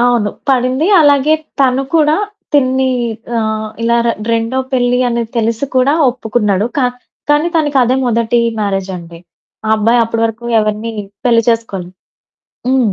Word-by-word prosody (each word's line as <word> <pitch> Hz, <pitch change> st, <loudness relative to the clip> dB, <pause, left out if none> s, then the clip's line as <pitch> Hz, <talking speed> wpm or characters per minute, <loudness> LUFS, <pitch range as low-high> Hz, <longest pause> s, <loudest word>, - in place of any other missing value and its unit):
అవును. 240 Hz, -4 st, +2 dB, 0.2 s
పడింది. 260 Hz, +3 st, +1 dB, 0.2 s
అలాగే 290 Hz, +1 st, +4 dB, 0.3 s
తను 265 Hz, 0 st, +3 dB
కూడా 310 Hz, -1 st, +4 dB, 0.4 s
తినని 265 Hz, -2 st, +2 dB, 0.5 s
ఆహ్, 220 Hz, -1 st, -2 dB
ఇలా 235 Hz, +1 st, +2 dB
ర -, -, +2 dB, 0.2 s
రెండో 230 Hz, +3 st, 0 dB
పెళ్లి 245 Hz, -1 st, +2 dB
అనేది 235 Hz, -1 st, -2 dB
తెలిసి 230 Hz, +4 st, -1 dB
కూడా 260 Hz, +3 st, +3 dB, 0.2 s
ఒప్పుకున్నాడు. 215 Hz, -4 st, 0 dB
కా 265 Hz, -, +2 dB, 0.5 s
కానీ 295 Hz, +3 st, +3 dB
తనకది 270 Hz, -5 st, +2 dB
మొదటి 235 Hz, 0 st, +1 dB, 0.2 s
మ్యారేజ్ 195 Hz, -2 st, -2 dB
అండి. 170 Hz, -1 st, -11 dB, 0.5 s
ఆ -, -, -1 dB
అబ్బాయి 230 Hz, +3 st, +2 dB
అప్పటివరకు 230 Hz, 0 st, -2 dB
ఎవరిని 215 Hz, +1 st, -1 dB, 0.3 s
పెళ్లి 230 Hz, -2 st, +4 dB
చేసుకోలేదు. 195 Hz, -6 st, -1 dB, 0.8 s
హ్మ్. 255 Hz, -6 st, +2 dB
235 Hz, 130 wpm, -14 LUFS, 220-260 Hz, 0.8 s, అలాగే